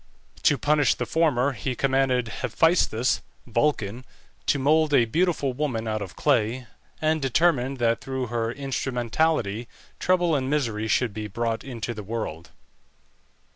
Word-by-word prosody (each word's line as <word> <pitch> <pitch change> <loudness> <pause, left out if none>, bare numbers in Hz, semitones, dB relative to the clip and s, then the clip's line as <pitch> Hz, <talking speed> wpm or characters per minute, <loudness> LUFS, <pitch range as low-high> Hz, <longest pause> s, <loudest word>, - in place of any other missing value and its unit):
To 145 - +4
punish 145 +1 +3
the - - -3
former 145 -5 +2
he 130 +1 -3
commanded 135 -2 +1 0.2
Hephæstus 130 -8 +2 0.2
(Vulcan) 120 -2 0 0.4
to - - +3
mould 150 +2 +3
a 120 - +5
beautiful 155 0 0
woman 125 -5 -2
out 110 -1 -2
of 95 -3 -7
clay, 125 -3 +1 0.3
and 155 0 +1
determined 135 -1 +2
that 115 -1 +1
through 130 -1 -3
her 115 -1 -2
instrumentality 125 -3 -1 0.3
trouble 180 -2 +2
and 130 -2 -1
misery 115 -7 -1
should 115 -1 +1
be 105 0 -5
brought 115 +2 -2
into 120 -3 -5
the 105 - -7
world. 100 -6 -5
130 Hz, 135 wpm, -25 LUFS, 115-145 Hz, 0.4 s, a